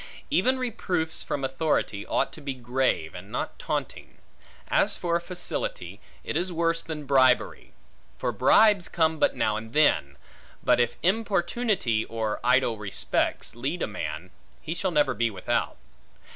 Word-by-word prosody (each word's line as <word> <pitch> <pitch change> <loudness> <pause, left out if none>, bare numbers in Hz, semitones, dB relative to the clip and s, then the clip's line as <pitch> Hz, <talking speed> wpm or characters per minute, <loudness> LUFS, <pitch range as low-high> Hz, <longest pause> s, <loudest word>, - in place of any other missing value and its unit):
Even 260 +1 +3
reproofs 185 -10 -2
from 140 - -3
authority, 135 -7 -1
ought - - 0
to - - -10
be 140 -2 -4
grave, 125 -10 0
and 95 +3 -10
not - - -4
taunting. - - -4 0.5
As - - +2
for 170 -1 0
facility: 180 - -5 0.2
it - - -4
is 180 +1 0
worse 165 0 0
than 155 -2 -6
bribery. 130 -2 +2 0.4
For - - -1
bribes 210 -5 +5
come 160 -1 +1
but - - +3
now 110 0 +1
and 110 +1 -8
then; 70 - +3 0.5
but - - +4
if 120 -1 +1
importunity, 195 - +1
or 110 -2 -3
idle 125 -3 +3
respects, 100 -2 -1
lead 140 +9 -3
a - - 0
man, 85 -4 -5 0.3
he 160 - -4
shall 190 +2 -1
never 145 -6 +2
be 120 -1 +1
without. 95 -4 -2
145 Hz, 145 wpm, -26 LUFS, 115-175 Hz, 0.5 s, bribes